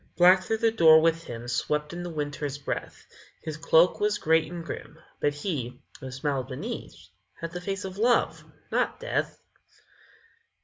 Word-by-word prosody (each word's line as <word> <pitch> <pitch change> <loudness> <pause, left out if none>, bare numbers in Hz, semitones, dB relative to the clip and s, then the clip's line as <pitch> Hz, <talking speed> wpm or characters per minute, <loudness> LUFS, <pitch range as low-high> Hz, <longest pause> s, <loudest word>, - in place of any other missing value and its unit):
_ - - -42
Black 180 +2 +7
through 220 - -1
the 225 0 +2
door 160 -7 +7
with 165 +1 +1
him 120 0 -7
Swept 150 +5 -1
in 175 - -5
the 175 - -5
Winter's 145 -2 -3
breath; 140 - -5 0.4
His 155 - -4
cloak 165 +2 +4
was 210 0 +1
great 160 -1 +2
and 170 -1 -6
grim - - -7 0.2
But 145 0 +1
he, 135 -7 -4 0.2
who 130 - -7
smiled 130 0 -2
beneath, 130 - -7 0.3
Had 165 0 -5
the 180 0 -6
face 195 +1 -3
of 190 +1 -7
Love 240 +2 +2 0.3
not - - 0
Death. - - -2
160 Hz, 170 wpm, -27 LUFS, 145-185 Hz, 0.4 s, Black